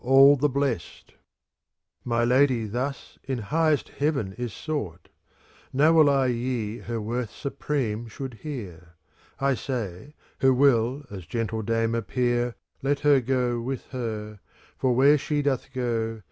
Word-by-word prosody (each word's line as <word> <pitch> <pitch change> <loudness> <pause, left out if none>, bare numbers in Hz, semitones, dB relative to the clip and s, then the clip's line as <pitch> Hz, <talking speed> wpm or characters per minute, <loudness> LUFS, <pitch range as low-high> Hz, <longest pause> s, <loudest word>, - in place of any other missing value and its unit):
35 135 +2 +7
CANZONIERE 140 - +1 1.2
My 120 -1 +1
Lady 125 -2 +3
thus 125 +6 -4
in 135 -1 -2
highest 150 +7 +1
heaven 140 -10 -1
is 120 +2 -4
sought: 100 - -5 0.6
Now 150 +5 +4
will 155 -3 +6
I 135 -1 +3
ye 120 -3 -2
her 115 -1 -4
worth 115 +2 -3
supreme 120 -5 -3
should 130 +3 -7
hear. 90 - -7 0.4
^ - - -20
1 140 -1 +3
say, 125 - -5 0.2
who 130 -1 +4
will 130 +1 +3
as 95 -4 -8
gentle 115 -1 -2
dame 115 +1 0
appear, 120 +2 0 0.3
Let 140 +1 0
her 145 -2 +5
go 125 -1 0
with 130 +1 -4
her, 110 -4 -5 0.4
for 125 -2 +1
where 140 +4 +5
she 145 +1 -1
doth 135 -1 -1
go. 115 -3 -2
125 Hz, 140 wpm, -26 LUFS, 115-140 Hz, 1.2 s, 35